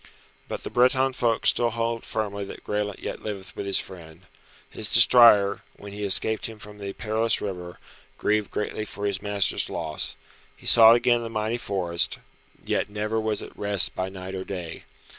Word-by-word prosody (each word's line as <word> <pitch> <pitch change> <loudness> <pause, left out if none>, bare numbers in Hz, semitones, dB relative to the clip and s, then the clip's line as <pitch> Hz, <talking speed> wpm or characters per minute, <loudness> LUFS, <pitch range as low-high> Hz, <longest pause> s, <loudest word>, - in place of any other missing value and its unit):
But - - -6
the - - -6
Breton 130 +2 +3
folk 120 -3 0
still 120 -1 +4
hold 115 0 -3
firmly 100 -2 -3
that - - -10
Graelent 105 -1 -3
yet - - -5
liveth 100 -3 -7
with 100 - -5
his 100 - +2
friend. 85 -2 -7 0.4
His - - -1
destrier, 105 -5 +6 0.2
when 100 0 -10
he 105 - -7
escaped 110 +2 +2
him 110 -1 -10
from 105 0 -11
the 100 -1 -6
perilous 110 +2 0
river, 90 -3 -6 0.4
grieved 105 -1 0
greatly 105 0 -3
for 100 0 -6
his 100 -2 -1
master's 105 -1 0
loss. 80 -2 -3 0.4
He - - -17
sought 115 0 +8
again 120 0 +2
the 115 - -5
mighty 110 +1 -2
forest, 90 -5 -1 0.5
yet - - -1
never 105 +2 -2
was 110 -1 -1
at - - -12
rest 100 -2 +1
by 95 0 -3
night 95 0 -8
or 95 -1 -4
day. 90 -4 -7
105 Hz, 180 wpm, -25 LUFS, 95-110 Hz, 0.5 s, sought